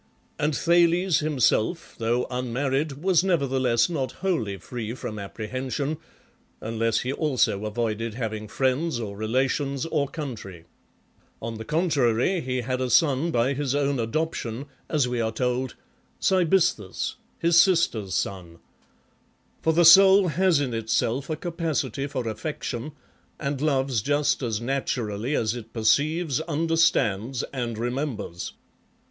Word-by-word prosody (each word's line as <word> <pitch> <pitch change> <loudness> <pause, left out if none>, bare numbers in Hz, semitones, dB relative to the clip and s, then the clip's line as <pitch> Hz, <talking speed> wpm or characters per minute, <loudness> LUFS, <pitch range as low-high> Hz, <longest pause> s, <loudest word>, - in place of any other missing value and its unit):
And 150 -1 +1
Thales 175 0 +3
himself, 150 0 +1
though 120 +2 +1
unmarried, 135 +4 -1
was 185 -2 +4
never 170 -7 +1
theless 125 -3 +2
not 135 -7 -3
wholly 125 - -1
free 115 +3 -6
from 110 -4 -6
apprehension, 130 +8 -4 0.6
unless 115 0 0
he 130 +2 -2
also 130 -9 +1
avoided 110 0 -2
having 110 -3 -4
friends, 130 +5 0
or 105 -3 -5
relations, 130 +6 0
or 145 -3 0
country. 115 - -7 0.7
On 115 -1 -5
the 110 - -6
contrary, 150 - +1
he 125 0 -2
had 130 +1 -2
a 130 - -1
son 145 +5 +3
by 130 -2 +1
his 140 -1 -1
own 140 -2 +1
adoption, 125 -1 -2 0.2
as 145 -5 +2
we 125 -1 -1
are 110 -1 0
told, 125 +2 -1 0.4
Cybisthus, 175 - +1 0.2
his 170 0 +5
sister's 145 - +1
son. 90 -4 -3 1.0
For 160 - +2
the 170 +1 +4
soul 190 +2 +8
has 175 0 +3
in 135 -4 -2
itself 115 +4 -1
a 155 - 0
capacity 160 -6 -2
for 130 -4 -4
affection, 125 +3 -4 0.5
and 140 -2 -3
loves 135 -6 +1
just 145 +5 +1
as 115 -5 -1
naturally 120 -1 -2
as 110 -1 +1
it 115 -2 -8
perceives, 145 +7 +2
understands, 145 - +1
and 120 -4 -3
remembers. 120 - -3
130 Hz, 130 wpm, -25 LUFS, 115-155 Hz, 1.0 s, soul